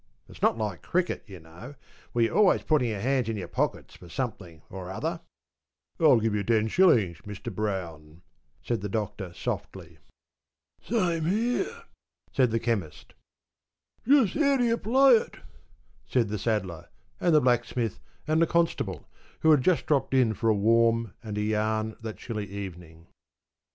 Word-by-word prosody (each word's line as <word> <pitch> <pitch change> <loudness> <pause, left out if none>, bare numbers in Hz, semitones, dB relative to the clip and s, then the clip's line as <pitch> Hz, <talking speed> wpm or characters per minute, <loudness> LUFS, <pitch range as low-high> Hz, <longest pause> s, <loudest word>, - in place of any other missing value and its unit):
It's - - -15
not - - +3
like 105 -5 -3
cricket, 180 0 -1
you 95 -3 -10
know, 85 - -12 0.4
where 120 -1 +2
your - - -3
always 205 -3 +4
putting 145 -6 +2
your 105 -3 -3
hands 130 -1 0
in 110 - -2
your 95 - -5
pockets - - -2
for 90 - -14
something 90 - -5
or 95 -1 -8
other.’ 95 - -3 0.8
‘I'll 145 -7 +6
give 105 -2 0
ten 110 -1 +2
shillings, 110 - +3
Mr 105 +1 -7
Brown,’ 85 -6 -5 0.4
said 120 -4 -2
the 105 - -4
Doctor 100 -3 -4
softly. 85 - -6 0.8
‘Same 175 -8 0
here,’ 245 - -1 0.5
said 130 -3 +3
the 115 +1 0
Chemist. 105 -10 -3 0.9
‘How 275 -2 +6
do 280 +4 +1
you 230 -1 +2
play 265 - +5
it?’ 470 - -6 0.8
asked 115 -5 +3
the 105 0 -3
Saddler, 95 -7 -2 0.3
and 175 -3 +3
the - - +7
Blacksmith, 120 -3 0 0.3
and 155 +1 +2
the 165 - +4
Constable, 160 - -1 0.3
who 160 - +5
had 150 -4 +5
just 175 +5 +2
dropped 140 -2 +1
in 125 -4 +3
for 115 +1 0
a 110 - +4
warm 115 0 +2
and 105 -3 -6
a - - 0
yarn 110 0 -1
that 110 -1 -6
chilly 110 -4 -5
evening. 90 -4 -9
115 Hz, 155 wpm, -27 LUFS, 100-155 Hz, 0.9 s, the